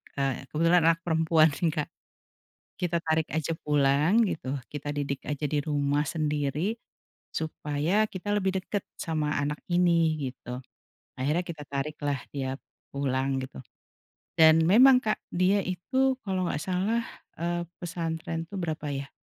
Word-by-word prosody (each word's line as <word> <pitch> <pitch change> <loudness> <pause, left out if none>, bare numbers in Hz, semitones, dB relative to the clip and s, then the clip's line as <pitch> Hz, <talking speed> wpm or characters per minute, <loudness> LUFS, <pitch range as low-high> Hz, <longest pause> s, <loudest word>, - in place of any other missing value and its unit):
e 135 -1 -1
kebetulan 165 +3 +3
anak 165 0 +4
perempuan 160 -1 +4
sih 165 +4 -1
Kak. 155 -2 -2 0.9
"Kita 175 -1 +1
tarik 160 -1 0
aja 160 +2 -1
pulang" 150 +9 +3
gitu, 140 -7 -3 0.2
"kita 145 0 -4
didik 140 -2 -2
aja 150 0 -2
di 150 +1 0
rumah 145 -1 +1
sendiri, 150 +4 -1 0.6
supaya 160 +6 0
kita 195 -1 -7
lebih 190 -1 0
deket 200 +1 -3
sama 155 -3 -1
anak 150 +1 -2
ini" 165 -5 +2
gitu. 125 0 -8 0.6
Akhirnya 150 +7 +1
kita 155 -4 -8
tarik 140 +2 -3
lah 140 -3 -1
dia 135 -2 -3 0.4
pulang 135 -1 0
gitu. 130 - -8 0.8
Dan 160 0 +6
memang 250 +6 +7
Kak, 215 -3 0 0.2
dia 185 +2 +3
itu 185 +8 -5 0.2
kalau 190 -4 -1
enggak 150 - -1
salah, 190 +7 0 0.4
eee, 175 0 -1 0.2
pesantren 165 -1 -3
itu 170 - -13
berapa 160 -3 -3
ya, 135 0 -4
160 Hz, 140 wpm, -28 LUFS, 145-175 Hz, 0.9 s, memang